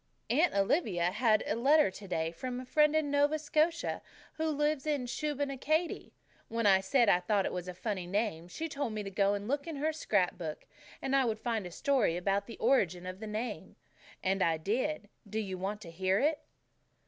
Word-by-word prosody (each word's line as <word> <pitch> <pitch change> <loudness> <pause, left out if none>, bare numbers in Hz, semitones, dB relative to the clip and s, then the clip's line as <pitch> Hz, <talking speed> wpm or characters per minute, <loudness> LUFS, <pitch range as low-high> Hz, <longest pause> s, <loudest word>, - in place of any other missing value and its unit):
Aunt 315 - +3
Olivia 195 - +2
had 215 +1 +3
a - - 0
letter 285 +1 +4
today 180 -5 -3
from 250 +8 -5
a 255 - -7
friend 300 +3 +3
in 305 -2 +1
Nova 290 +2 +3
Scotia, 315 +2 0 0.3
who 320 0 -2
lives 295 -1 0
in 290 -4 0
Shubenacadie. 290 +4 -1 0.4
When 230 0 -2
I 195 -2 +6
said 240 +3 +3
I 180 - +5
thought 195 +2 +1
it - - -2
a 180 - -5
funny 185 -2 -3
name, 195 -4 -1
she 320 - -4
told 285 -6 -3
me 210 -1 -3
to 195 - -6
go 200 +1 +2
and 200 +1 -5
look 285 +4 -1
in 325 - -4
her 305 +3 0
scrap 200 - 0
book, 155 -3 -5 0.4
and 270 0 +1
I 270 -1 +4
would 225 -2 0
find 220 -4 -2
a - - -10
story 245 -5 +1
about 195 +2 0
the 230 - -9
origin 180 -9 +2
of 185 +1 -6
the 220 - -6
name. 215 +3 -5 0.5
And 190 +1 +1
I 165 -2 +3
did. 225 - -1 0.2
Don't 220 +2 -2
you 190 -2 -5
want 205 +3 -3
to 170 -5 -9
hear 185 +3 +1
it?" 295 +5 +2
220 Hz, 200 wpm, -31 LUFS, 190-285 Hz, 0.5 s, I